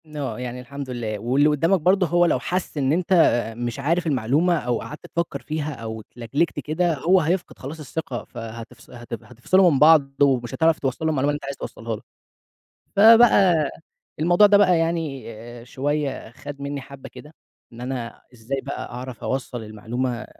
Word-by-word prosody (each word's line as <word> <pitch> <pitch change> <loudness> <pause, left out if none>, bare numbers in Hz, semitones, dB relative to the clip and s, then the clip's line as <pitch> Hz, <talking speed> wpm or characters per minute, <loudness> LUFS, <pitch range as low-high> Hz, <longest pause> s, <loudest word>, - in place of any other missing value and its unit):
آه 130 -7 -4
يعني 125 0 -5
الحمد 140 +1 -8
لله. 110 -4 -4
واللي 135 +7 +3
قُدّامك 165 +6 +2
برضه 185 +3 +3
هو 175 +2 +3
لو 155 - +2
حَس 175 +4 -3
إن 135 +1 +1
أنت 180 +2 0 0.4
مش 120 +3 -4
عارف 165 +5 0
المعلومة 150 +6 +2
أو 120 -1 -1
قعَدت 150 - -9
تفكّر 170 -1 -2
فيها 155 -1 -3
أو 110 -3 -7
اتلجلِجْت 120 +9 -2
كده 165 +2 0
هو 180 +7 +4
هيفقِد 175 +4 -2
خلاص 145 +5 -7
الثقة، 145 -4 -5
فهتفص 115 -1 -10
هت 120 -1 -10
هتِفصِلوا 175 +9 +3
من 135 - +1
بعض، 150 -2 +6
ومش 130 -4 +2
هتعرَف 160 -1 +3
توصَّل 135 +3 -2
له - - +2
المعلومة 140 -1 +1
اللي - - -2
أنت 145 -1 -7
عايز 140 0 -4
توصَّلها 115 -1 -5
له. - - -11 1.0
فبقى، 200 -8 +6 0.5
الموضوع 175 +6 +6
ده 205 0 +5
بقى 180 -4 +4
يعني 165 -6 -2
آآ، 115 +2 -11
شوية 140 -1 -3
خَد 140 +3 -10
منِّي 140 0 -4
حَبّة 140 0 -11
كده، 150 +2 -13 0.4
إن 120 - -11
أنا 125 -2 -5
إزاي 125 +4 -4
بقى 140 - -6
أعرَف 125 -1 -8
أوصَّل 130 -3 -3
المعلومة 120 +3 -4
140 Hz, 175 wpm, -23 LUFS, 120-165 Hz, 1.0 s, بعض